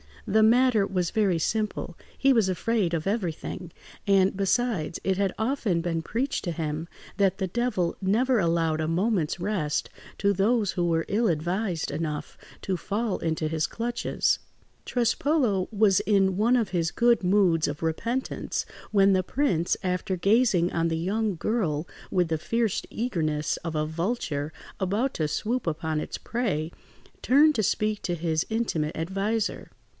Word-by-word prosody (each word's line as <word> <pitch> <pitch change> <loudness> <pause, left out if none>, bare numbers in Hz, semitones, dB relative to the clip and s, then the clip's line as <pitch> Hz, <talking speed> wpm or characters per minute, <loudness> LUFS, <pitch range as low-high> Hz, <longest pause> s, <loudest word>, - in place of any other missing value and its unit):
The 220 +2 +3
matter 235 -2 +4
was 180 -3 -1
very 200 -5 +2
simple: 210 -1 -2 0.2
he 275 - +4
was 225 -5 +3
afraid 190 0 0
of 160 -2 -1
everything; 180 -3 -3 0.4
and, 195 -1 +4
besides, 195 -4 0
it 190 -1 +1
had 195 -2 +1
often 220 -7 0
been 165 -1 -1
preached 240 - -2
to 175 - -1
him 160 0 -3 0.3
that 195 -2 +2
the 190 - -1
Devil 205 -4 -1
never 230 +6 +2
allowed 165 -3 +1
a 155 - -1
moment's 175 -1 0
rest 175 -6 -1 0.3
to 200 0 +3
those 205 +1 +2
who 175 - -1
were 165 -1 +1
ill 225 +3 +1
advised 175 +1 -1
enough 150 0 -4 0.3
to 190 -2 -1
fall 205 +4 -2
into 160 -1 -1
his 155 0 0
clutches. 235 +1 -1 0.5
Trespolo 240 - +1
was 205 -3 +4
in 195 -2 +2
one 230 +4 +3
of 230 -5 +1
his 170 -2 0
good 235 -3 +3
moods 180 -4 +3
of 145 +2 -5
repentance, 230 +11 -2 0.3
when 195 -2 +5
the 185 -1 +2
prince, 185 - +1
after 185 0 -1
gazing 195 -2 +3
on 165 0 +1
the 165 -1 -1
young 200 +4 -1
girl 170 -5 -1 0.2
with 180 -3 +1
the 160 - +1
fierce 230 +3 0
eagerness 155 -10 -1
of 165 -1 -5
a 155 0 +1
vulture 160 -3 -2 0.3
about 210 +8 0
to 155 - 0
swoop 225 +9 -2
upon 160 -1 -1
its - - -5
prey, 190 -10 -2 0.5
turned 295 +4 +5
to 220 - 0
speak 215 +1 0
to 175 - -1
his 160 -1 -1
intimate 195 -9 -1
adviser. 195 +6 -2
190 Hz, 155 wpm, -26 LUFS, 165-220 Hz, 0.5 s, when